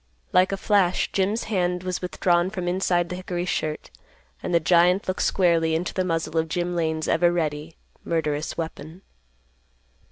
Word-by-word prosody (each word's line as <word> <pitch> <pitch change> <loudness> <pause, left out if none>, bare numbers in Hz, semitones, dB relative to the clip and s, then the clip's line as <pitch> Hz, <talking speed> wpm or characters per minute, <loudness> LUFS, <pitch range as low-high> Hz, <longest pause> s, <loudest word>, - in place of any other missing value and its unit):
Like 185 +2 +4
a 195 - -1
flash 195 -3 +2
Jim's 200 +4 0
hand 180 -4 -1
was 185 -1 -3
withdrawn 180 -1 +1
from 185 -3 -4
inside 175 -1 +1
the 180 - -4
hickory 180 -1 -3
shirt, 155 -4 -3 0.5
and - - -4
the 170 - +4
giant 175 +3 +3
looked 185 - -2
squarely 165 -3 +2
into 170 +2 -2
the 185 - 0
muzzle 165 -2 -1
of 160 0 -2
Jim 175 +1 -2
Lane's 160 -2 -1
ever 175 +1 +3
ready, 155 -2 -2 0.3
murderous 155 -2 -2
weapon. 160 +2 -6
175 Hz, 160 wpm, -24 LUFS, 165-185 Hz, 0.5 s, Like